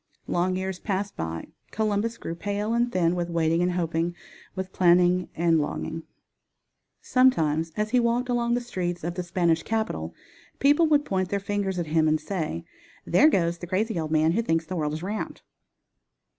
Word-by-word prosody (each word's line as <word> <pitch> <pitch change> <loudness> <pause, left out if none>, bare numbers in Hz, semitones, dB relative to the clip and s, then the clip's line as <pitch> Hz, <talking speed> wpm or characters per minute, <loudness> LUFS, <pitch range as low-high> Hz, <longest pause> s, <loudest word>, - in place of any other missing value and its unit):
Long 180 +1 0
years 190 -1 -3
passed 200 0 -2
by. 80 0 -5 0.2
Columbus 220 +1 -1
grew 165 - -5
pale 205 +5 -2
and 240 +1 +1
thin 175 -3 +2
with 175 -1 -2
waiting 165 0 +1
and 180 0 +1
hoping, 170 0 -1 0.4
with 190 0 -5
planning 180 0 +4
arid 165 -1 +3
longing. 160 +2 -3 1.0
Sometimes 165 - +2
as 210 0 -1
he 250 - +4
walked 240 +1 +1
along 240 -1 +1
the 245 - -1
streets 175 -7 -3
of 170 +1 -2
the 180 - -3
Spanish 170 -2 +1
capital 85 - -2 0.4
people 295 +4 +4
would 295 -1 +3
point 185 -2 -1
their 200 - 0
fingers 200 -1 -2
at 175 - -1
him 160 -1 +4
and 155 0 +2
say: 155 - -4 0.4
"There 285 - +5
goes 170 - +1
the 175 - -7
crazy 200 +1 0
old 155 -1 -3
man 155 +1 +3
who 215 +7 +1
thinks 165 -7 0
the 185 - -5
world 150 -3 -1
is 160 +2 -5
round." 205 +3 -4
180 Hz, 180 wpm, -26 LUFS, 165-210 Hz, 1.0 s, There